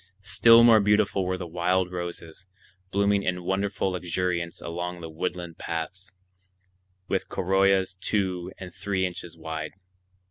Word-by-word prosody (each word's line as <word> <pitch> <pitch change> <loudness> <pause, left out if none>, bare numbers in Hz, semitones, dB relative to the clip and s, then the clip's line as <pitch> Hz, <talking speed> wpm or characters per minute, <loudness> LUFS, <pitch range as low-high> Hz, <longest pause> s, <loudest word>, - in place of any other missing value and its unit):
Still 115 +3 +6
more 115 -2 +8
beautiful 105 -2 +2
were 95 0 -1
the 90 - -5
wild 90 +2 0
roses, 85 0 -6 0.4
blooming 100 +1 +2
in 90 -2 -2
wonderful 95 +1 -1
luxuriance 90 -1 -2
along 90 +1 -4
the 80 -1 -7
woodland 85 0 -4
paths, 85 +3 -5 1.0
with - - -1
corollas 95 0 +2
two 95 -3 -1
and 90 -2 -9
three 95 -2 -1
inches 90 -2 -6
wide. 80 -1 -5
90 Hz, 130 wpm, -26 LUFS, 85-95 Hz, 1.0 s, more